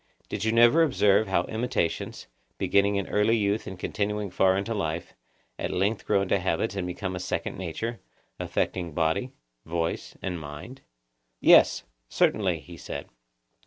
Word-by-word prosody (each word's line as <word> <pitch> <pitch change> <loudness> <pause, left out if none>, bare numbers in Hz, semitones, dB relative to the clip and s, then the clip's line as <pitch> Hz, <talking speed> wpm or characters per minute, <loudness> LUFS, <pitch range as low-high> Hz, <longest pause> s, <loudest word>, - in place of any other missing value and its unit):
Did - - -3
you 110 - +2
never 120 +8 +6
observe 110 -9 +3
how 90 -2 +2
imitations, 110 -7 -2 0.3
beginning 100 +1 +2
in 100 -1 0
early 105 +2 +2
youth 105 0 0
and 95 - -6
continuing 105 +1 -2
far 95 +1 +3
into 100 +4 -2
life, 85 -5 -3 0.5
at - - -2
length 100 +4 -1
grow 100 -2 +3
into 100 +1 +1
habits 95 +3 -1
and 95 -2 -2
become 95 +1 -4
a - - -4
second 90 - -3
nature, 95 +7 -4 0.4
affecting 85 -4 -2
body, 80 - 0 0.3
voice, 85 0 -3
and 90 -3 -4
mind? 75 - -9 0.6
Yes, - - +6 0.3
certainly, - - +1
he - - -12
said. - - -7
100 Hz, 150 wpm, -27 LUFS, 90-110 Hz, 0.6 s, never